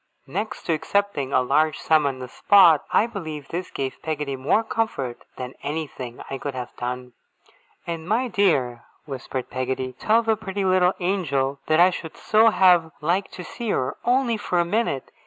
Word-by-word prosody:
Next 200 +11 -4
to 165 - 0
accepting 160 -3 -1
a 130 - +3
large 155 +4 +2
sum 155 -2 +3
on 135 -2 -2
the 130 -1 -7
spot, 170 +1 +5
I - - +4
believe 160 -10 -6
this 180 +2 -4
gave 135 -1 -4
Peggotty 150 -3 -3
more 135 +12 +1
comfort 220 - -3
than 125 0 -6
anything 140 -5 -5
I 135 - -5
could 140 0 -5
have 125 -1 -6
done. 125 0 -5 0.7
'And, 165 0 -5
my 240 +4 +2
dear!' 140 - +1 0.2
whispered 130 -2 -5
Peggotty, 130 0 -2
'tell 220 - +2
the 225 -1 +2
pretty 200 -2 -4
little 185 0 +4
angel 140 -8 0
that 155 +1 +3
I 180 +2 +7
should 165 -2 -7
so 220 +1 +4
have 180 -5 +4
liked 175 +5 -1
to 180 - -7
see 235 +5 -6
her, 130 -9 0
only 245 -2 +2
for 180 -4 -1
a 170 - +3
minute! 200 - -1
160 Hz, 175 wpm, -23 LUFS, 135-200 Hz, 0.7 s, I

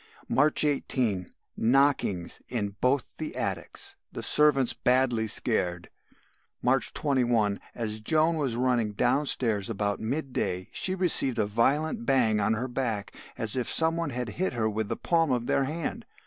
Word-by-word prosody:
"March 150 +3 +2
18. 125 -10 0 0.3
Knockings 120 -8 +1
in 105 -5 -3
both 130 0 0
the 155 - -5
attics. - - -4 0.2
The - - -6
servants 145 -4 +4
badly 125 -3 +2
scared. 90 -6 -1 0.7
"March 125 0 +1
21. 120 -8 +1 0.2
As 110 -2 -3
Joan 155 +8 +2
was 140 -7 -1
running 120 -4 +1
downstairs 120 -4 +1
about 100 -2 -1
mid 135 +4 -3
day, 90 +1 -2
she 185 - -1
received 170 -8 +2
a - - +2
violent 145 - +1
bang 115 - +2
on 110 +1 +2
her 125 +4 -3
back 120 -5 -2 0.2
as 115 0 -3
if 125 -2 -1
some 165 0 +2
one 170 -2 -2
had 125 -2 -3
hit 190 - 0
her 115 -3 0
with 110 -1 -2
the - - -2
palm 165 -2 +1
of 120 -2 0
their 135 - +1
hand. 160 +4 -4
125 Hz, 155 wpm, -27 LUFS, 110-145 Hz, 0.7 s, servants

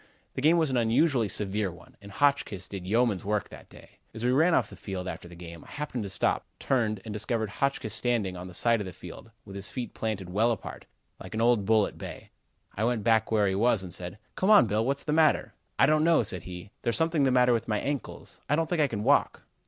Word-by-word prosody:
The - - -4
game 160 +4 +5
was 160 -4 +1
an 130 - +1
unusually 120 0 +2
severe 100 +1 -2
one, 85 - -16
and 100 0 -11
Hotchkiss 140 -7 0
did 95 -2 -7
yeoman's 110 -3 +1
work 105 +1 -1
that - - -13
day. - - -17 0.2
"As 115 +2 -4
we 125 - +3
ran 160 +6 +4
off - - +2
the - - -12
field, 95 -2 -6
after 90 - -6
the 85 - -12
game, 85 -1 -10
I - - -16
happened 145 -5 -4
to 100 - -5
stop, 95 - 0
turned, 110 -6 0
and 110 - -5
discovered 110 0 -1
Hotchkiss 135 -4 -1
standing 115 -6 -1
on 90 +1 -7
the 90 - -10
side 115 +2 +3
of 100 - -5
the 90 - -8
field, 115 - -11 0.2
with 100 -1 -10
his 100 0 -2
feet 125 -2 -5
planted 105 -5 -4
well 110 +5 +2
apart, 110 - -6 0.3
like - - -9
an 110 - -1
old 115 -4 +3
bull 110 0 +4
at - - -9
bay. - - -9 0.4
I 105 - -2
went 115 -2 0
back 110 -1 +2
where 105 -2 +3
he 95 - +1
was 110 0 +2
and 90 -2 -8
said: 90 +2 -6 0.2
"'Come 190 - 0
on, 210 - +8
Bill, 110 +1 0
what's 140 +3 -1
the 150 - -1
matter?' 155 -1 +3 0.2
"'I - - +6
don't 155 +1 +3
know,' 165 -6 +4
said 95 -4 -3
he. 90 +3 -9
'There's 120 - 0
something 165 -1 +1
the 135 - +4
matter 125 -1 +4
with 115 - -1
my 105 -2 0
ankles. 140 -4 -5
I 145 - +3
don't 165 +1 0
think 170 -1 0
I 145 - +4
can 105 -5 -4
walk.' - - +2
110 Hz, 250 wpm, -28 LUFS, 100-130 Hz, 0.4 s, on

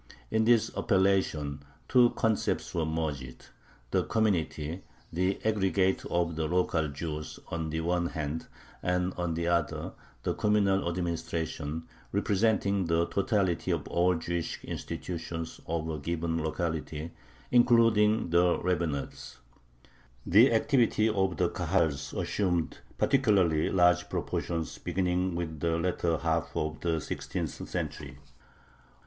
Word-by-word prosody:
In 110 0 +2
this 115 -1 +3
appellation 95 -8 +1 0.3
two 125 -1 +6
concepts 110 -2 0
were 80 -2 0
merged: 75 -6 -4 0.4
the - - +2
"community," 85 -6 0 0.3
the 90 +3 0
aggregate 95 -3 +2
of 85 -1 0
the 80 0 -1
local 85 -2 +1
Jews, 75 +1 -5
on 80 -1 -3
the 80 +1 -2
one 85 +1 +1
hand, 80 0 -4 0.3
and, 90 +1 0
on 85 -2 -2
the 85 +1 -2
other, 85 -3 0 0.3
the - - 0
"communal 100 -4 +2
administration," 80 -3 -3 0.3
representing 100 -2 +1
the 85 0 +2
totality 95 -2 0
of - - -1
all 90 +1 +3
the - - -3
Jewish 85 0 -3
institutions 85 -1 -5
of 80 -1 -2
a 80 -2 -3
given 80 +1 -2
locality, 80 -1 -3 0.4
including 115 -5 +4
the 85 0 +4
rabbinate. 85 -6 -2 0.9
The 110 +9 +6
activity 115 -2 +3
of 95 -4 0
the - - +2
Kahals 75 -4 0
assumed 90 -5 -1 0.2
particularly 100 - +3
large 90 -1 +3
proportions 80 -2 -3
beginning 90 -1 0
with 80 -3 -4
the 80 +1 +1
latter 85 -1 0
half 80 0 -1
of 75 0 -2
the 85 -2 0
sixteenth - - -4 0.2
century. 75 -6 -4
85 Hz, 120 wpm, -29 LUFS, 80-95 Hz, 0.9 s, two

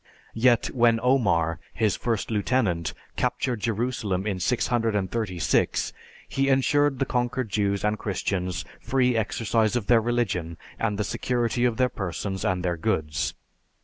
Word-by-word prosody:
Yet, 120 0 +3
when 115 -2 +4
Omar, 95 - +2 0.2
his 110 -3 +2
first 115 -2 -2
lieutenant, 100 - 0 0.2
captured 125 -4 0
Jerusalem 110 -3 -1
in 100 -3 -1
636, 110 -4 0 0.3
he 135 0 0
ensured 140 +1 +3
the 135 - 0
conquered 125 -1 -1
Jews 100 -1 0
and 105 0 0
Christians 95 -3 -2
free 125 0 +1
exercise 110 0 +1
of 120 -4 -1
their 115 0 +5
religion, 95 -9 -1 0.2
and 105 -3 0
the 105 - 0
security 120 +3 0
of 120 -2 +1
their 130 0 +4
persons 95 -3 -4
and 95 -4 0
their 85 -1 0
goods. 80 -6 -1
110 Hz, 135 wpm, -26 LUFS, 95-120 Hz, 0.3 s, their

